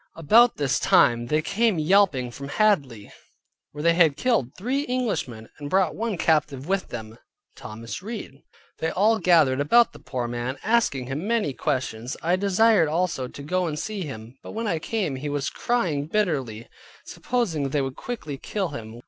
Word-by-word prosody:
About 225 +10 +5
this 140 -3 0
time 120 0 +3
they 155 +4 +1
came 220 0 +1
yelping 155 -7 +3
from 140 +3 -8
Hadley, 145 - 0 0.6
where 150 0 -7
they 170 0 +4
had 165 -4 +4
killed 225 - 0
three 260 +8 -1
Englishmen, 200 - -2
and 145 -1 -6
brought 190 +2 +2
one 225 -4 -2
captive 150 -4 +1
with 195 0 0
them, 110 -2 -7
viz. 115 - -17 0.4
Thomas 115 +8 -8
Read. 210 - -7 0.4
They 160 - 0
all 215 +5 +2
gathered 155 -9 +4
about 235 +12 +4
the - - -13
poor 125 -3 -4
man, 120 +3 -4
asking 220 - +1
him 140 +9 -4
many 225 -11 0
questions. 130 -3 -3
I 175 +2 +2
desired 200 -1 +3
also 165 -5 -1
to 140 - -10
go 180 +4 0
and 150 -2 -3
see 210 +5 -4
him; 125 -5 -8
and - - -9
when 230 +1 -2
I 170 -7 0
came, 175 -7 -2
he 145 +3 -4
was 145 -1 -2
crying 170 -12 -1
bitterly, 140 - -1 0.4
supposing 175 - -2
they 140 0 0
would 135 -1 -4
quickly 155 - -6
kill 195 +2 -3
him. 115 -5 -8
155 Hz, 175 wpm, -24 LUFS, 130-205 Hz, 0.6 s, About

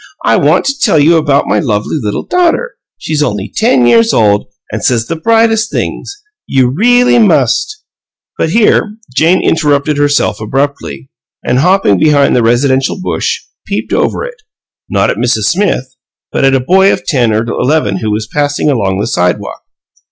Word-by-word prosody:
I - - +3
want - - +2
to 275 +1 -2
tell 195 - +2
you 155 +3 +4
about 145 -3 +1
my - - 0
lovely 110 +1 -2
little 105 -2 -3
daughter. 360 +7 0 0.2
She's 155 -1 -3
only 105 -7 -3
ten 175 - +2
years 230 - +3
old, 105 -2 +2 0.3
an' 105 - -3
says 115 -3 0
the 165 - -4
brightest 225 +4 +1
THINGS! 405 +1 -5 0.2
You 130 -2 +1
really 245 - +3
must 190 - +1 0.3
" - - -59
But - - 0
here 215 +1 +1 0.2
Jane 165 +5 +2
interrupted 150 -2 +1
herself 145 -7 0
abruptly, 115 - -4 0.3
and, 125 +1 +1
hopping 175 - +2
behind 145 -2 +3
the 125 - +2
residential 130 +6 +1
bush, 465 - -2 0.3
peeped - - -4
over - - -1
it, - - -11 0.5
not - - +1
at - - -5
Mrs. 120 -3 0
Smith, 170 -9 -1 0.4
but - - -1
at 135 0 +3
a - - +2
boy 190 +9 +3
of - - -3
ten 125 -7 +1
or 110 +1 0
eleven 125 -4 -1
who 110 +3 -3
was 105 +1 -2
passing 145 +3 -1
along 100 -7 -1
the 105 - -1
sidewalk. 90 0 -2
145 Hz, 170 wpm, -11 LUFS, 115-195 Hz, 0.5 s, you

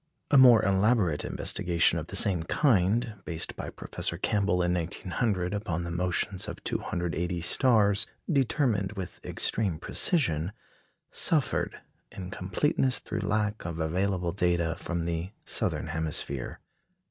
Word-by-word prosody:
A 145 - +6
more 120 -5 +8
elaborate 100 -4 +2
investigation 85 -1 +2
of 80 - -7
the 95 - -7
same 95 -4 +3
kind, 105 - +1
based 80 -3 -4
by - - -5
Professor 85 - -4
Campbell 100 -2 +1
in 90 0 +1
1900 90 +2 -1
upon 90 -5 -2
the 85 - -5
motions 90 +2 -1
of - - -7
280 85 0 -2
stars, 100 +1 +3 0.2
determined 125 - +1
with 95 -3 -7
extreme 100 -8 -1
precision, 90 - 0 0.6
suffered 155 -6 0 0.3
in 90 -1 -7
completeness 130 - +1
through 110 - -5
lack 105 +1 -1
of 85 -1 -5
available 90 +2 0
data 85 -2 0
from 85 -1 -3
the 85 +3 -3
southern - - -2
hemisphere. 75 -4 -2
90 Hz, 125 wpm, -28 LUFS, 85-105 Hz, 0.6 s, more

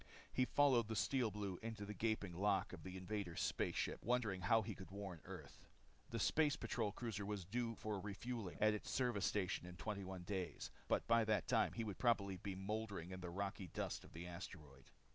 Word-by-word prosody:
He 130 - +4
followed 130 -5 +5
the 110 - -2
Steel 125 +2 +3
Blue 100 -3 -3
into 110 -2 -4
the 105 - -4
gaping 105 -3 0
lock 100 +3 +2
of - - -7
the 95 0 -6
invaders' 95 -2 -3
space - - +1
ship - - 0
wondering 110 -5 +2
how 110 +5 +5
he - - -3
could 95 - -9
warn 95 -4 -5
Earth. - - -9 0.4
The - - -2
Space 150 -2 +4
Patrol 110 -4 0
cruiser 105 -1 -3
was 100 -3 -2
due 115 +5 0
in 115 - -4
for 105 -2 -2
refueling 105 +1 -4
at 110 0 +6
his 105 - -4
service 120 -7 +2
station 95 -3 0
in 90 - -7
21 95 -1 -3
days. 95 -1 -3 0.2
But - - +2
by 115 0 +5
that 110 -1 +2
time 115 -2 +4
he 115 - -1
probably 105 -2 +2
would 90 - -8
be 100 -2 -3
mouldering 100 -2 -2
in 95 0 -5
the 90 - -4
rocky 95 +1 -2
dust - - -2
of - - -14
the 85 +2 -5
asteroid. 75 -6 -8
100 Hz, 205 wpm, -42 LUFS, 95-110 Hz, 0.4 s, at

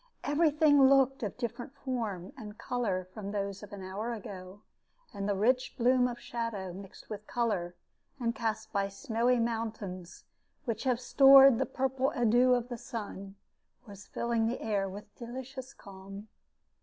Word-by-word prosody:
Every 305 +2 +3
thing 290 -3 +5
looked 270 -1 +4
of 210 -5 -2
a - - -33
different 240 +2 -5
form 225 -10 -4
and 215 -4 -9
color 200 -7 -2
from 200 -2 -6
those 200 -1 -3
of 210 - -11
an 200 -2 -8
hour 205 +6 -4
ago, 195 -2 -9 0.5
and 200 0 -3
the 200 - +1
rich 250 +6 +1
bloom 250 +1 +4
of 240 -1 -6
shadow 225 -6 -4
mixed 195 +1 -11
with 210 0 -7
color, 205 -8 -1 0.4
and 235 -2 0
cast 220 -1 -3
by 200 -1 +1
snowy 240 +3 0
mountains, 220 -6 -4 0.4
which 230 0 -3
have 250 -2 +2
stored 270 -1 +8
the 265 - 0
purple 265 +1 0
adieu 245 +1 +4
of 245 -1 -2
the 240 -2 -5
sun, 200 -4 -7 0.5
was 205 -1 -12
filling 235 -1 0
the 240 - -2
air 200 -3 -1
with 205 +2 -10
delicious 260 +2 -7
calm. 195 0 -11
230 Hz, 160 wpm, -31 LUFS, 200-250 Hz, 0.5 s, stored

